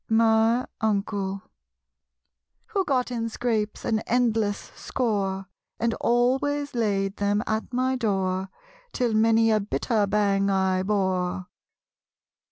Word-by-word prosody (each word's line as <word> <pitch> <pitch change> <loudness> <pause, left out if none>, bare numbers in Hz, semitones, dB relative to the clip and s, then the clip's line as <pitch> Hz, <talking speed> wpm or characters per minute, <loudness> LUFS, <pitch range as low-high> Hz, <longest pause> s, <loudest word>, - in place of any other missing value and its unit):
My 225 +2 +3
Uncle. 200 -2 -1 1.3
Who 400 -4 0
got 255 -4 0
in 230 -1 -2
scrapes, 220 -2 -2
an 220 -1 +1
endless 225 -4 0
score, 195 -6 -2 0.3
And 230 0 +1
always 270 +4 +1
laid 200 -4 0
them 205 +1 +1
at 220 +2 -2
my 255 +1 0
door, 190 -4 -1 0.4
Till 245 -3 0
many 225 +1 +4
a 215 - +3
bitter 210 +1 0
bang 200 -1 +2
I 190 -1 +1
bore? 185 -2 -1
220 Hz, 110 wpm, -25 LUFS, 195-235 Hz, 1.3 s, many